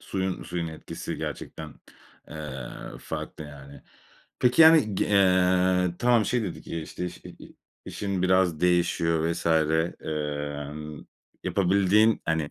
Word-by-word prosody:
Suyun 95 -1 -3
suyun 85 -2 -4
etkisi 80 - -7
gerçekten, 80 -2 -7 0.5
eee, 65 -5 -7 0.3
farklı, 80 - -6
yani. 70 -1 -12 0.6
Peki, 125 +6 +5
yani, 160 -10 +6
g - - +1
eee, 90 -2 +3
tamam, 120 -3 +3
şey 120 +1 0
dedik, 95 - -6
eee, 85 - -4
işte, 90 +3 -5
şey - - -12
i - - -14 0.3
işin 100 -3 -3
biraz 95 -4 +2
değişiyor 85 -2 +1
vs. 85 - -6
emm, 75 -2 -2 0.4
yapabildiğin, 100 +3 +3
hani 80 -2 -1
85 Hz, 120 wpm, -26 LUFS, 75-95 Hz, 0.6 s, yani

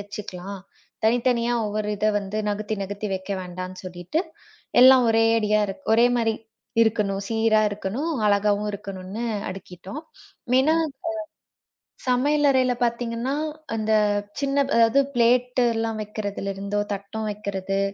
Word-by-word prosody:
வச்சுக்கலாம். 200 -1 -7 0.4
தனித்தனியா 235 +1 +2
ஒவ்வொரு 210 0 -2
இத 210 +2 0
வந்து 200 +2 -4
நகர்த்தி 210 +1 -2
நகர்த்தி 205 +2 -5
வைக்க 190 +1 -6
வேண்டாம்னு 185 +1 -7
சொல்லிட்டு 175 - -3 0.6
எல்லாம் 260 0 +8
ஒரே 225 0 +4
அடியா 215 -1 +2 0.3
ஒரே 235 +2 +6
மாரி 225 -2 +1 0.5
இருக்கணும், 205 -3 0
சீரா 225 -1 +3
இருக்கணும், 210 +10 -3 0.2
அழகாவும் 205 0 +2
இருக்கணும்னு 200 +2 -6 0.3
அடுக்கிட்டோம். 185 - -8 0.6
ஏன்னா 310 +4 +3
இப்ப 270 -2 -15 1.1
சமையல் 290 +4 +3
அறையில 255 -2 +3
பாத்தீங்கன்னா 235 +2 -1 0.4
அந்தச் 210 -2 +1
சின்ன 280 0 0 0.2
அதாவது 230 +3 +5 0.2
பிளேட் 245 +1 +3
எல்லாம் 225 -1 -2
வைக்கிறதுல 205 -2 -4
இருந்தோ 200 +1 -2
தட்டும் 210 +2 -4
வைக்கிறது, 195 -2 -3
215 Hz, 115 wpm, -24 LUFS, 200-235 Hz, 1.1 s, எல்லாம்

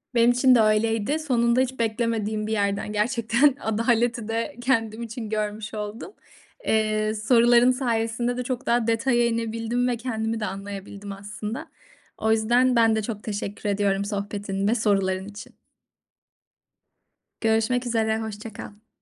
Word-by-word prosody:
Benim 235 +1 +5
için 250 +1 +5
de - - +5
öyleydi. 225 +5 +1
Sonunda 240 -5 +2
hiç 260 -1 -2
beklemediğim 220 -2 -1
bir - - -4
yerden 200 0 -1
gerçekten 235 +5 +2
adaleti 230 +1 0
de 230 +6 -2
kendim 230 -3 0
için 225 -1 -6
görmüş 210 0 -3
oldum. 210 - -6 0.5
Eee, 215 0 +1
soruların 235 +3 +4
sayesinde 240 -1 -1
de 250 - -2
çok 255 +1 -4
daha 235 -1 +1
detaya 240 +1 +2
inebildim 230 +1 -1
ve 245 -1 0
kendimi 225 -2 -3
de 210 - -2
anlayabildim 200 +1 -7
aslında. 210 +6 -6 0.5
O 220 - +1
yüzden 240 +3 +3
ben 225 -1 +4
de 220 - 0
çok 210 -1 -5
teşekkür 205 0 -4
ediyorum 200 -1 +1
sohbetin 200 -1 -3
ve 225 - +3
soruların 195 -4 +1
için. 205 0 -11 1.8
Görüşmek 225 +2 +1
üzere. 220 -2 0
Hoşça 220 0 -7
kal. 210 +2 -11
225 Hz, 140 wpm, -24 LUFS, 210-240 Hz, 1.8 s, Benim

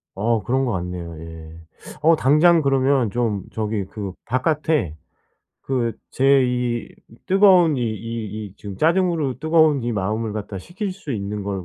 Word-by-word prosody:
어 110 +2 0
그런 130 +4 0
것 120 - -1
같네요. 85 -2 -5
예. 80 -1 -10 0.5
어 165 +2 +5
당장 155 +4 +4
그러면 135 -3 +2
좀 110 -5 -1
저기 105 -3 -2
그 100 -1 -6
바깥에 130 - 0 0.7
그 125 -4 0 0.2
제 135 0 +4
이 125 -1 -2 0.4
뜨거운 185 -5 +5
이 - - -2
이 110 -1 -4
이 95 - -14
지금 100 -2 -8
짜증으로 165 - +1
뜨거운 155 -4 +3
이 120 - -2
마음을 105 +2 -2
갖다 105 -2 -5
식힐 185 - -5
수 185 -7 -7
있는 105 -1 -4
걸 100 -2 -4
120 Hz, 265 characters per minute, -22 LUFS, 100-150 Hz, 0.7 s, 어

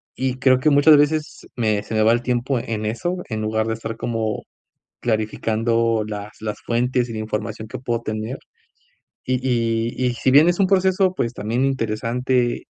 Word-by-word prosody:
Y 130 -1 -1
creo 130 -1 +4
que 155 - +3
muchas 145 +1 +6
veces 150 +1 0
me 110 -4 +1
se 110 - -7
me 110 - +3
va 110 - +5
el 120 +1 +2
tiempo 125 +1 0
en 110 -2 -4
eso, 120 +12 -2
en 110 -2 -3
lugar 110 +1 0
de 115 - 0
estar 115 0 -6
como 115 -2 -2 0.6
clarificando 115 0 0
las 105 0 -6
las 110 -1 -4
fuentes 125 +1 0
y - - -5
la 110 - -4
información 110 0 -4
que 105 - -7
puedo 120 -2 -2
tener. 110 +3 -4 0.9
Y 130 - 0
y 115 +1 0
y 120 - -2
si 130 - +1
bien 150 +5 +7
es 175 - +1
un 195 - +4
proceso, 190 -1 +2
pues, 115 -9 -1
también 120 +3 -1
interesante, 125 0 0
115 Hz, 185 wpm, -21 LUFS, 110-130 Hz, 0.9 s, bien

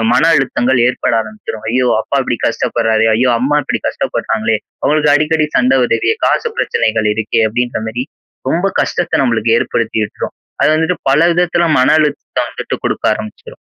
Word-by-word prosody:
மன 165 - +3
அழுத்தங்கள் 130 -2 +1
ஏற்பட 125 - -1
ஆரம்பிச்சுரும். 110 0 -8
ஐயோ! 125 0 +1
அப்பா 140 - -1
இப்படி 120 - -2
கஷ்டப்படுறாரே. 115 -2 0
ஐய்யோ! 125 +1 +2
அம்மா 145 +4 +1
இப்படி - - -3
கஷ்டப்படுறாங்களே 110 0 -1 0.3
அவங்களுக்கு 150 -1 +3
அடிக்கடி 155 0 +1
சண்டை 130 +1 +3
வருதே 395 - +1
காசு 465 - +1
பிரச்சனைகள் 110 -1 0
இருக்கே. 110 +1 0
அப்படின்ற 120 +1 -2
மாரி. 120 +4 -3 0.4
ரொம்ப 175 +6 +1
கஷ்டத்த 160 -3 0
நம்மளுக்கு 115 -2 +1
ஏற்படுத்தி 115 -1 -1
விட்டுரும். - - -6 0.3
அது - - +4
வந்துட்டு 160 +3 0
பல 140 +3 +3
விதத்துல 170 0 +1
மன 130 - +3
அழுத்தத்தை 150 -2 -1
வந்துட்டு - - -5
குடுக்க - - -2
ஆரம்பிச்சுரும். 110 - -9
125 Hz, 155 wpm, -15 LUFS, 115-150 Hz, 0.4 s, அது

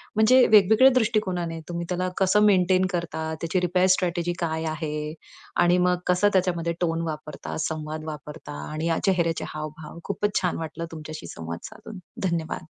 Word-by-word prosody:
म्हणजे 245 +4 +6
वेगवेगळ्या 220 +5 +6
दृष्टिकोनाने, 185 -8 0
तुम्ही 170 0 -3
त्याला 185 0 -1
कसं 190 +2 +3
मेंटेन 185 -2 +4
करता? 170 -2 -3 0.2
त्याची 170 +2 0
रिपेअर 180 +1 +3
स्ट्रॅटेजी 175 -1 -1
काय 160 -1 -2
आहे? 150 -1 -4 0.5
आणि 175 +1 +4
मग 180 0 +2
कसं 180 +3 +4
त्याच्यामध्ये 175 -3 +1
टोन 165 -1 0
वापरता, 150 -2 -6
संवाद 155 0 -5
वापरता? 150 - -8
आणि 155 +2 -3
या 165 - +1
चेहऱ्याचे 170 -4 +1
हावभाव, 155 +1 -7
खूपच 200 +1 -1
छान 180 -2 0
वाटलं 165 +1 -5
तुमच्याशी 155 - -8
संवाद 85 +1 -6
साधून, 200 -4 -11 0.3
धन्यवाद. 165 -1 -3
170 Hz, 150 wpm, -25 LUFS, 155-185 Hz, 0.5 s, म्हणजे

